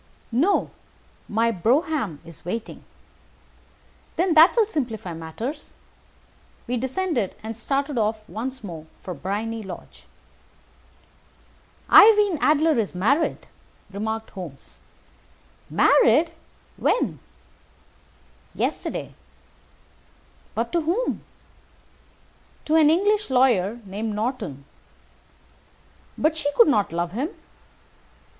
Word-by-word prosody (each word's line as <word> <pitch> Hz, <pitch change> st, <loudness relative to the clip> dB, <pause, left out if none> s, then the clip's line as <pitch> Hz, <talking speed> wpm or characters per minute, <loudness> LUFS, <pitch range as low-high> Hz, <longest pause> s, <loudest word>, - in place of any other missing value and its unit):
"No, 315 Hz, -, +2 dB, 0.6 s
my 230 Hz, +2 st, +2 dB
brougham 235 Hz, -, 0 dB
is 165 Hz, -2 st, -13 dB
waiting." 220 Hz, +6 st, -5 dB, 1.3 s
"Then 355 Hz, 0 st, +2 dB
that 320 Hz, +3 st, +7 dB
will 455 Hz, -3 st, +4 dB
simplify 235 Hz, -, -4 dB
matters." 220 Hz, -, -6 dB, 0.9 s
We 250 Hz, -, -2 dB
descended, 260 Hz, -, -1 dB
and 225 Hz, +1 st, -5 dB
started 275 Hz, +3 st, -1 dB
off 215 Hz, 0 st, -1 dB
once 255 Hz, +3 st, -5 dB
more 165 Hz, -5 st, -8 dB, 0.2 s
for 180 Hz, -, -5 dB
Briony 215 Hz, +6 st, -3 dB
Lodge. 190 Hz, -4 st, -10 dB, 1.9 s
"Irene 415 Hz, -5 st, +7 dB
Adler 305 Hz, -2 st, +3 dB
is 205 Hz, -4 st, -2 dB
married," 265 Hz, -, +1 dB, 0.5 s
remarked 220 Hz, +2 st, -4 dB
Holmes. 150 Hz, -, -10 dB, 0.9 s
"Married! -, -, +4 dB, 0.5 s
When?" -, -, 0 dB, 1.4 s
"Yesterday." -, -, -3 dB, 1.4 s
"But 230 Hz, +2 st, -2 dB
to 340 Hz, -, +1 dB
whom?" 360 Hz, +11 st, -1 dB, 1.4 s
"To 310 Hz, -, -1 dB
an 315 Hz, -2 st, +6 dB
English 410 Hz, +5 st, +2 dB
lawyer 240 Hz, -5 st, +2 dB
named 205 Hz, +2 st, -4 dB
Norton." 210 Hz, -, -3 dB, 1.5 s
"But 310 Hz, +1 st, +2 dB
she 290 Hz, -2 st, -1 dB
could 470 Hz, -, +6 dB
not 210 Hz, -, +2 dB
love 170 Hz, +1 st, -2 dB
him." 260 Hz, -, -2 dB
235 Hz, 95 wpm, -24 LUFS, 205-310 Hz, 1.9 s, that